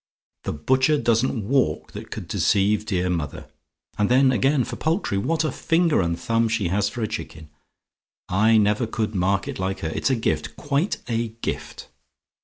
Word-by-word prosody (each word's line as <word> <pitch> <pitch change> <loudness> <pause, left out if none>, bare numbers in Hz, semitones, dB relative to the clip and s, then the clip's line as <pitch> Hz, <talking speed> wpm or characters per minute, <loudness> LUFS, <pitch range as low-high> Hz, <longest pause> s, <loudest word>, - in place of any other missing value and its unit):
The - - -1
butcher 130 - +2
doesn't 115 -4 +1
walk 130 - +1
that - - -9
could - - -7
deceive 105 +2 +1
dear 90 -3 0
mother. 85 -6 -3 0.5
And 105 - +2
then, 130 +1 +5
again, 135 +1 +2
for - - -6
poultry! 160 - 0
What 160 +9 0
a 155 - 0
finger 165 - +2
and 85 -1 -1
thumb 115 0 +1
she 105 -5 0
has 100 +3 +1
for 120 -2 -4
a - - 0
chicken! 80 -6 -7 0.8
I 110 +4 +4
never 105 +2 +2
could 110 -1 -2
market 95 +1 0
like 95 +1 -2
her: 80 - -2
it's 80 - -1
a 130 - +3
gift 75 -9 -2
quite 145 - -1
a 115 -1 -1 0.2
gift. - - -5
110 Hz, 175 wpm, -23 LUFS, 95-130 Hz, 0.8 s, then